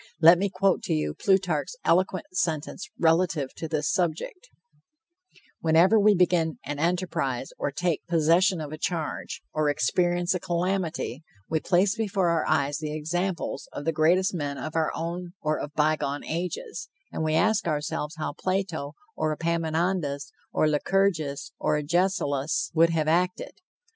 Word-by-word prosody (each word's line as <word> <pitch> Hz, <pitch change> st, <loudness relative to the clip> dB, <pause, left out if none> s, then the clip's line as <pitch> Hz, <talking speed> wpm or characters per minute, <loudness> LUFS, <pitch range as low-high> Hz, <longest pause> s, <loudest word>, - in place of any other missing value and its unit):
Let 170 Hz, +2 st, +8 dB
me 200 Hz, +1 st, +1 dB
quote 190 Hz, 0 st, +1 dB
to -, -, 0 dB
you 75 Hz, -1 st, -1 dB
Plutarch's 180 Hz, -, +1 dB
eloquent 185 Hz, +1 st, +2 dB
sentence 165 Hz, +5 st, -2 dB
relative 165 Hz, -4 st, +2 dB
to 165 Hz, -, -5 dB
this 155 Hz, +1 st, -1 dB
subject: 185 Hz, -, -2 dB, 1.1 s
"Whenever 170 Hz, +7 st, +5 dB
we 210 Hz, 0 st, +5 dB
begin 175 Hz, -3 st, +2 dB
an 145 Hz, 0 st, -4 dB
enterprise 165 Hz, -7 st, -1 dB
or -, -, 0 dB
take 170 Hz, +4 st, -2 dB
possession 170 Hz, +3 st, +3 dB
of 150 Hz, -1 st, -6 dB
a 155 Hz, -, -7 dB
charge, 165 Hz, -2 st, -3 dB
or 155 Hz, -1 st, +1 dB
experience 175 Hz, +4 st, +1 dB
a 180 Hz, -, -1 dB
calamity, 170 Hz, -6 st, -2 dB, 0.3 s
we 160 Hz, -, 0 dB
place 190 Hz, +5 st, +2 dB
before 200 Hz, -5 st, 0 dB
our 165 Hz, -2 st, +1 dB
eyes 145 Hz, -1 st, +1 dB
the 155 Hz, -1 st, -4 dB
examples 175 Hz, +4 st, -3 dB
of 145 Hz, -, -6 dB
the 165 Hz, -, +2 dB
greatest 175 Hz, +5 st, +3 dB
men 145 Hz, -5 st, -3 dB
of 155 Hz, -, -6 dB
our 160 Hz, -1 st, +1 dB
own 175 Hz, +1 st, -4 dB
or 155 Hz, 0 st, -1 dB
of 145 Hz, -, -5 dB
bygone 150 Hz, -2 st, 0 dB
ages, 180 Hz, -, -4 dB, 0.2 s
and -, -, -3 dB
we 155 Hz, 0 st, +1 dB
ask 210 Hz, +2 st, +2 dB
ourselves 150 Hz, +1 st, -2 dB
how 155 Hz, -2 st, -3 dB
Plato, 185 Hz, -5 st, -2 dB, 0.2 s
or 155 Hz, 0 st, 0 dB
Epaminondas, 165 Hz, -2 st, -1 dB, 0.2 s
or 155 Hz, -, +2 dB
Lycurgus, 155 Hz, -2 st, 0 dB
or -, -, +1 dB
Agesilaus, 150 Hz, -3 st, 0 dB
would 165 Hz, +1 st, +5 dB
have 160 Hz, -2 st, 0 dB
acted. 180 Hz, +3 st, +1 dB
165 Hz, 150 wpm, -26 LUFS, 155-180 Hz, 1.1 s, Let